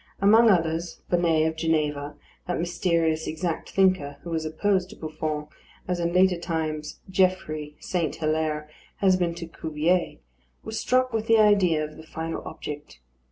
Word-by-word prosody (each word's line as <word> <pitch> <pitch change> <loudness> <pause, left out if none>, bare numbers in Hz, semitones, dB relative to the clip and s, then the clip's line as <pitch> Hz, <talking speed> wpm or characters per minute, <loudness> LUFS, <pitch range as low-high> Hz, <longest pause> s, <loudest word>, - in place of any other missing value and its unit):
Among 220 +4 +6
others, 165 -2 0
Bonnet 165 -3 +3
of 160 - -2
Geneva, 150 -3 0 0.3
that 180 - -1
mysterious 170 -2 0
exact 160 +1 -3
thinker, 185 -7 +2
who 170 - -6
was 160 -1 -1
opposed 185 +4 0
to - - -11
Buffon, 155 -1 -4 0.4
as 180 -1 -1
in 170 0 0
later 180 0 +4
times 155 -3 -3
Geoffrey 180 -6 0
St. 170 -4 -2
Hilaire 155 -1 -1 0.3
has 190 -2 +3
been 175 -2 0
to 170 0 -6
Cuvier, 160 - -1 0.5
was 220 0 -4
struck 255 -1 +2
with 225 0 -1
the 225 - +6
idea 200 -7 +4
of 150 0 -11
the 160 - -10
final 160 +1 -5
object. 145 - -8
165 Hz, 155 wpm, -26 LUFS, 155-185 Hz, 0.5 s, Among